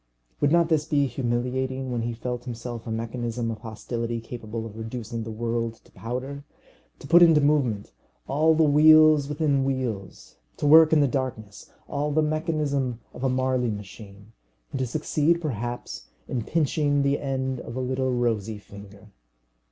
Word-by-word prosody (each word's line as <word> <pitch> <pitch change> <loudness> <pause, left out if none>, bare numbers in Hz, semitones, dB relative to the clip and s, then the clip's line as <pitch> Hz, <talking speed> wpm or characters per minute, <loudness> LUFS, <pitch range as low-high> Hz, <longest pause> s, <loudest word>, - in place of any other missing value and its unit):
Would 145 - +2
not 170 0 +4
this 155 -2 +2
be 145 -2 +2
humiliating, 130 +1 -2
when 120 -1 -1
he 115 0 -3
felt 125 +1 -5
himself 120 -1 -6
a - - -3
mechanism 115 +1 -3
of 110 - -6
hostility 115 +1 -4
capable 115 -1 -6
of 110 -2 -9
reducing 115 +1 -5
the 110 - -6
world 115 +1 -2
to - - -23
powder! 130 +5 -5 0.5
To - - -13
put 170 +3 +7
into 165 -3 +7
movement 135 - +1 0.4
all 155 +3 +3
the 160 - +4
wheels 155 -1 +6
within 145 -2 +1
wheels, 125 -8 -4 0.2
to - - -3
work 160 +2 +8
in 155 -2 +5
the 140 - +4
darkness 120 -6 -4 0.2
all 145 +1 -2
the 155 +1 +2
mechanism 150 -5 -1
of 125 - -8
a 135 - +2
Marly 130 -1 0
machine, 105 0 -9 0.4
and 135 - -4
to 130 - 0
succeed 155 +4 +1
perhaps 120 -6 -5 0.2
in 120 -4 -3
pinching 145 -2 +1
the 140 +1 +1
end 130 -2 -2
of 115 - -8
a - - -3
little 130 +1 -1
rosy 115 -3 -1
finger! 100 0 -14
130 Hz, 165 wpm, -25 LUFS, 115-145 Hz, 0.5 s, work